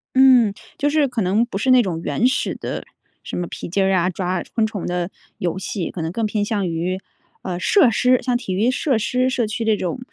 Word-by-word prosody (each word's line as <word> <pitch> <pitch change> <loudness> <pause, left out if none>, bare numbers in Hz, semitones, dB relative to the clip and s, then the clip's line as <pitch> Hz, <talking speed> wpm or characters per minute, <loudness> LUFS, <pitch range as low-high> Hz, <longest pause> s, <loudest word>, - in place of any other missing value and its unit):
嗯。 255 -5 +6 0.2
就 290 - +1
是 295 -1 +2
可 245 -3 -2
能 200 +5 +2
不 235 - -5
是 245 +6 0
那 255 -1 +7
种 170 -5 -3
原 230 - 0
始 255 0 -1
的 - - -5 0.4
什 - - -6
么 175 - -1
皮 - - -7
筋 195 +3 +1
儿 190 0 +2
啊， 180 -1 +2
抓 180 0 -2
昆 225 - +2
虫 215 -4 -4
的 175 0 -2 0.3
游 180 +1 -2
戏， 190 -2 -4
可 175 - -5
能 160 0 -2
更 225 +4 -1
偏 210 0 -1
向 205 -3 -1
于 175 +3 -2 0.4
呃， 180 -2 -3
设 275 - +4
施， 250 +3 +3
像 250 -2 0
体 195 -6 -4
育 220 +6 +2
设 265 -1 +1
施 250 +4 +1
社 250 -3 0
区 220 +2 -3
这 220 -1 +3
种 180 +4 -3
210 Hz, 250 characters per minute, -21 LUFS, 185-250 Hz, 0.4 s, 那